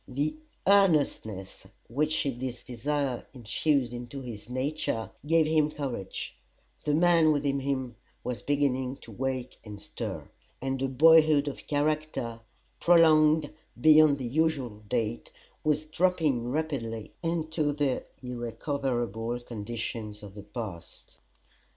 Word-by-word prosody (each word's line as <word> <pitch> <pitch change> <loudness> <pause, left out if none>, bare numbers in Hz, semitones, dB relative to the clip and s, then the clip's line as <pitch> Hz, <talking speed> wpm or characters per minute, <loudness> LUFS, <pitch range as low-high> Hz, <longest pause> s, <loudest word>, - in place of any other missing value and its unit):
The 140 - -1 0.3
earnestness 150 - +2 0.2
which 150 +6 0
this 130 -2 -4
desire 130 +1 -2
infused 125 +2 0
into 120 +3 -6
his 115 -3 -8
nature 130 -3 -2 0.2
gave 165 0 +4
him 155 -1 +3
courage; 135 -10 -5 0.5
the 150 - +2
man 165 -1 +5
within 140 -2 +1
him 130 -3 -2 0.3
was 120 -4 -4
beginning 135 -2 0
to 115 - -12
wake 130 +2 -3
and 105 -2 -9
stir; 100 - -6 0.3
and 135 0 -2
a 135 - +1
boyhood 155 +1 +6
of 140 - -6
character, 150 -5 -1 0.4
prolonged 155 -3 +5 0.3
beyond 155 +1 +7
the 130 - -4
usual 135 -5 0
date, 115 -1 -1 0.3
was 150 0 +1
dropping 155 -7 +1
rapidly 125 -7 -3
into 160 -3 0
the 145 -3 0 0.2
irrecoverable 120 -2 -2
conditions 110 -2 -5
of 100 -2 -9
the 105 - -9
past. 100 -6 -8
135 Hz, 115 wpm, -28 LUFS, 120-155 Hz, 0.5 s, beyond